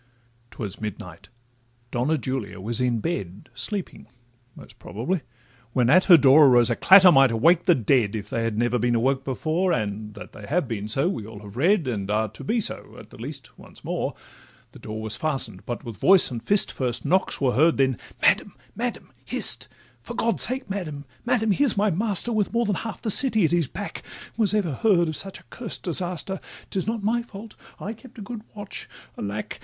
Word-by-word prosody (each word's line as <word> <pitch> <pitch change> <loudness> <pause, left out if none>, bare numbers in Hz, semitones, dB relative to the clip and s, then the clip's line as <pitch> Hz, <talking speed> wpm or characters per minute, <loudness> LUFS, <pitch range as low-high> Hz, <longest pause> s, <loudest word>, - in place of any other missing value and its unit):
'Twas 105 -4 -7
midnight—Donna 120 - -6
Julia 130 -8 -4
was 115 +5 -1
in 120 -3 0
bed, 100 - -5
Sleeping, 180 - -5 0.5
most - - -15
probably,—when 125 - -4
at 185 +4 +5
her 175 -4 +9
door 140 +1 +7
Arose 120 -2 +5
a - - +1
clatter 190 +4 +8
might 135 -3 +6
awake 165 +10 +3
the 175 -3 +5
dead, 115 -3 +1
If 105 - -5
they 115 - -1
had 115 -2 -2
never 120 +1 +1
been 120 +1 +1
awoke 130 +3 +1
before, 160 +7 -1
And 105 -4 -3
that 105 - -10
they 105 - -11
have 160 -1 0
been 105 -3 -4
so 135 +9 0
we 115 - -3
all 110 -2 -10
have 100 0 -12
read, 170 - +2
And 100 -5 -3
are 110 +1 0
to 110 - -11
be 230 +2 0
so, 215 - -3
at - - -13
the - - -13
least, - - -9
once - - -15
more. - - -3 0.6
The - - -14
door 110 0 -6
was 110 -1 -3
fasten'd, 135 -11 -3
but 120 - -4
with 115 -3 -8
voice 190 -6 +5
and 120 -2 -5
fist 200 - +2
First 125 -2 -2
knocks 185 +6 +1
were 130 -3 +1
heard, 160 +5 +3
then 130 -4 +1 0.2
'Madam—Madam—hist! - - -1 0.3
'For 125 - -9
God's 230 -1 0
sake, 255 +2 -1
Madam—Madam—here's 200 - -1
my 205 +1 +2
master, 205 +4 0
With 215 -1 0
more 235 0 +1
than 205 - 0
half 225 - -6
the 220 - +3
city 220 -5 +6
at 160 - 0
his 170 -4 +2
back— 205 +8 -7 0.3
Was 215 -2 +2
ever 185 -8 0
heard 175 - +2
of 155 - -3
such 195 +4 -5
a - - -21
curst 230 -4 -6
disaster! 180 +1 -2 0.3
'Tis 190 0 -2
not 225 -2 -2
my 230 +3 +1
fault—I 215 -1 -10
kept 230 -1 -13
good 220 +2 -7
watch—Alack! 110 - -7
140 Hz, 185 wpm, -24 LUFS, 115-195 Hz, 0.6 s, her